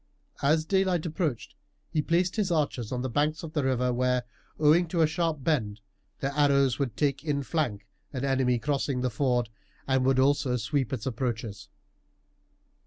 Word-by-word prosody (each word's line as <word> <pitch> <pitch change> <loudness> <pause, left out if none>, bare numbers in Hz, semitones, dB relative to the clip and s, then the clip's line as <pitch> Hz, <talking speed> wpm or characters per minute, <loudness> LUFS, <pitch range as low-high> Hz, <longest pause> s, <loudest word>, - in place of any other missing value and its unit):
As 155 +3 +3
daylight 185 -2 +1
approached 155 - -2 0.4
he 155 - +1
placed 175 +3 +1
his 210 -3 0
archers 145 -9 -1
on 125 -1 -2
the - - -1
banks 150 +6 0
of 160 -1 -7
the 150 - 0
river 125 -1 +1
where, 125 0 +1 0.3
owing 155 +3 +4
to 170 - -4
the 165 - +5
sharp 160 -2 -1
bend, 110 -10 0 0.4
their 135 - 0
arrows 140 -3 +3
would 130 -6 -2
take 140 -2 0
in 145 -3 -1
flank 125 - -2 0.3
an 130 -1 -3
enemy 130 -2 +2
crossing 135 0 -1
the 125 -1 0
ford, 125 -1 0 0.4
and 130 -1 +2
would 135 0 +3
also 130 -1 +2
sweep 130 +2 -1
its 125 -5 -3
approaches. 115 -4 -3
140 Hz, 170 wpm, -28 LUFS, 125-155 Hz, 0.4 s, the